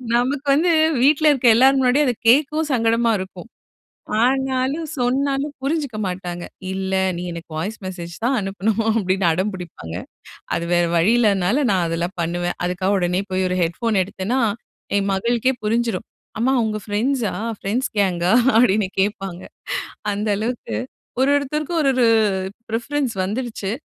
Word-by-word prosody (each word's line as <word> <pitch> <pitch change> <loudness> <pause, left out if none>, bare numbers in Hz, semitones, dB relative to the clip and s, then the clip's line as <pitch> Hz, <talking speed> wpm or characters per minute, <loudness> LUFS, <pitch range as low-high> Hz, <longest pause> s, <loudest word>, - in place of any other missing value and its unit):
நமக்கு 270 +4 0
வந்து 335 +4 +3 0.3
வீட்ல 300 +2 +5
இருக்க 265 -3 -1
எல்லார் 265 +3 +5
முன்னாடியும் 265 +3 +3
அத 250 - +2 0.2
கேட்கவும் 305 +4 +3
சங்கடமா 230 0 +2
இருக்கும். 185 0 -8 0.8
ஆனாலும் 265 +4 +1
சொன்னாலும் 275 +3 0
புரிஞ்சுக்க 280 -5 -2
மாட்டாங்க. 175 -1 -5 0.3
"இல்லை, 190 0 -1
நீ 175 - -5
எனக்கு 170 0 -9
வாய்ஸ் 210 +7 -4
மெசேஜ் 175 -2 -6
தான் 260 +1 +2
அனுப்பணும்."அப்படின்னு 200 -1 0
அடம் 185 +5 0
புடிப்பாங்க. 160 - -8 0.6
அது 170 - -2
வேற 175 0 +3
வழி 180 +7 +4
இல்லைனால 210 +5 +2
நான் 185 -3 +2
அதெல்லாம் 170 +3 -3
பண்ணுவேன். 175 +1 -2
அதுக்காக 185 +2 0
உடனே 180 +1 0
போய் 185 0 +1
ஒரு 180 - -1
ஹெட்ஃபோன் 195 +5 0
எடுத்தேன்னா, 200 +7 -2 0.6
என் 200 0 +1
மகளுக்கே 235 +6 +1
புரிஞ்சிரும். 230 -2 0 0.3
"அம்மா 260 +3 +2
உங்கள் 215 -1 -3
ஃப்ரெண்ட்ஸா? 225 +2 0 0.2
ஃப்ரெண்ட்ஸ் 230 +7 -1
கேங்கா?" 180 -2 +2 0.2
அப்படின்னு 215 -4 +4
கேட்பாங்க. 195 -3 -2 0.7
அந்த 210 +2 -2
அளவுக்கு. 235 +3 -3 0.4
ஒரு 265 - +3
ஒருத்தருக்கும் 300 +4 -1
ஒரு 275 - +3
ஒரு 245 -2 +4 0.6
பிரிஃபரன்ஸ் 250 +2 -1
வந்துருச்சு. 215 -1 -3
220 Hz, 135 wpm, -21 LUFS, 185-260 Hz, 0.8 s, வீட்ல